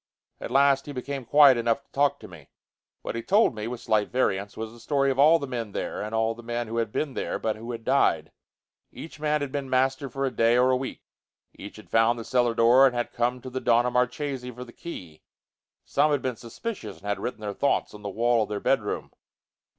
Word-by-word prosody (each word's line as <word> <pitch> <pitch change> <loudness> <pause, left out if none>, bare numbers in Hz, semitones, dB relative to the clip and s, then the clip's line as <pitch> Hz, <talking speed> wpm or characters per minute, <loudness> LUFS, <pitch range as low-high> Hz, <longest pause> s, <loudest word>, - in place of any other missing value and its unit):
At - - -6
last 140 +2 +3
he 145 - -6
became 135 0 -5
quiet 140 0 +6
enough 115 +3 0
to - - -43
talk 140 0 +1
to - - -10
me. 80 -6 -14 0.5
What - - -4
he 115 - -3
told 205 - +3
me, 110 0 -5
with 120 0 -6
slight 105 -1 +1
variants, 100 -5 -1
was 110 0 -5
the 120 - -15
story 140 +2 +1
of 130 - -3
all 155 +4 +7
the 145 - -5
men 115 -6 -5
there - - -4
and 110 +2 -4
all 110 0 +1
the 120 - -12
men 120 0 -3
who 115 +1 -4
had 115 -2 -1
been 145 +2 -2
there - - -3
but 110 -1 -2
who 115 +3 -7
had 115 -1 -7
died. 135 +3 +2 0.6
Each 160 - -10
man 150 0 0
had 140 -2 -3
been 140 -1 -4
master 130 +1 +1
for 135 +3 -2
a 135 - -1
day 115 +1 +3
or 125 +1 +4
a - - +3
week. 130 0 -5 0.5
Each 100 - -10
had 110 - -15
found 115 +1 +3
the 115 - -7
cellar 120 -2 +1
door 120 +4 +6
and 125 - -2
had 120 - -2
come 125 +1 -1
to 130 - -7
the 130 +1 -4
Donna 120 +1 +3
Marchesi 125 +1 -1
for 125 0 -8
the 120 -1 -14
key. 90 - -9 0.6
Some 145 +2 +2
had 145 -2 0
been 130 -2 -2
suspicious 125 - -7
and - - -17
had 100 0 -2
written 120 - -5
their 105 -1 -4
thoughts 140 - 0
on 105 - -11
the 100 - -5
wall 115 +3 +2
of 105 - -2
their 105 -1 -3
bedroom. - - -1
125 Hz, 240 wpm, -26 LUFS, 115-135 Hz, 0.6 s, all